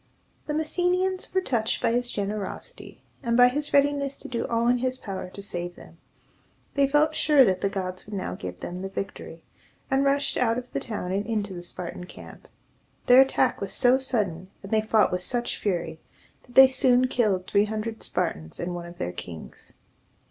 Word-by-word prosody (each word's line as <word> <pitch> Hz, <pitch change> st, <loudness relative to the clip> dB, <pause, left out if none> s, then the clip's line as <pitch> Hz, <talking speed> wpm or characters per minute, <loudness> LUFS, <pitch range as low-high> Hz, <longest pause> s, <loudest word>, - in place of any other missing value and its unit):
The 300 Hz, -, -2 dB
Messenians 360 Hz, +4 st, 0 dB
were 375 Hz, -, +1 dB
touched 230 Hz, -10 st, 0 dB
by -, -, +1 dB
his 245 Hz, +1 st, 0 dB
generosity, 205 Hz, -2 st, -5 dB, 0.2 s
and 235 Hz, -3 st, +1 dB
by 245 Hz, 0 st, +8 dB
his 290 Hz, +3 st, -3 dB
readiness 280 Hz, -1 st, +2 dB
to -, -, -10 dB
do 235 Hz, -2 st, -3 dB
all 230 Hz, 0 st, +1 dB
in 245 Hz, 0 st, +3 dB
his 255 Hz, +1 st, 0 dB
power 195 Hz, -6 st, -6 dB
to 200 Hz, -, -9 dB
save 175 Hz, -2 st, -5 dB
them. -, -, -15 dB, 0.7 s
They 280 Hz, -1 st, +3 dB
felt 300 Hz, +3 st, +3 dB
sure 295 Hz, -4 st, +5 dB
that 185 Hz, -3 st, +1 dB
the 195 Hz, -, +1 dB
gods 185 Hz, -1 st, -5 dB
would 210 Hz, -, -6 dB
now 185 Hz, -, -3 dB
give 90 Hz, -1 st, -7 dB
them 180 Hz, +1 st, -5 dB
the 195 Hz, -, -4 dB
victory, 195 Hz, 0 st, -7 dB, 0.5 s
and 270 Hz, +1 st, +3 dB
rushed 280 Hz, +1 st, +1 dB
out 230 Hz, -2 st, +2 dB
of 250 Hz, 0 st, -6 dB
the -, -, 0 dB
town 205 Hz, -5 st, -5 dB
and 195 Hz, +2 st, 0 dB
into 210 Hz, -4 st, -2 dB
the 175 Hz, -, -6 dB
Spartan 180 Hz, 0 st, -7 dB
camp. -, -, -12 dB, 0.6 s
Their 250 Hz, +1 st, +8 dB
attack 270 Hz, -, +2 dB
was 200 Hz, -, -3 dB
so 255 Hz, +1 st, +4 dB
sudden, 195 Hz, -9 st, -2 dB
and 195 Hz, -, -9 dB
they 220 Hz, -1 st, +3 dB
fought 220 Hz, 0 st, +3 dB
with 180 Hz, 0 st, -1 dB
such 240 Hz, +5 st, -2 dB
fury, 170 Hz, -5 st, -2 dB, 0.5 s
that 245 Hz, -, -18 dB
they 265 Hz, 0 st, +10 dB
soon 255 Hz, -1 st, +3 dB
killed 210 Hz, -7 st, +1 dB
three 200 Hz, +2 st, +3 dB
hundred 220 Hz, +1 st, -4 dB
Spartans 80 Hz, +1 st, -3 dB
and 175 Hz, +1 st, -3 dB
one 175 Hz, -1 st, -6 dB
of 175 Hz, 0 st, -12 dB
their 90 Hz, -, -3 dB
kings. 85 Hz, -2 st, -10 dB
225 Hz, 195 wpm, -26 LUFS, 185-260 Hz, 0.7 s, they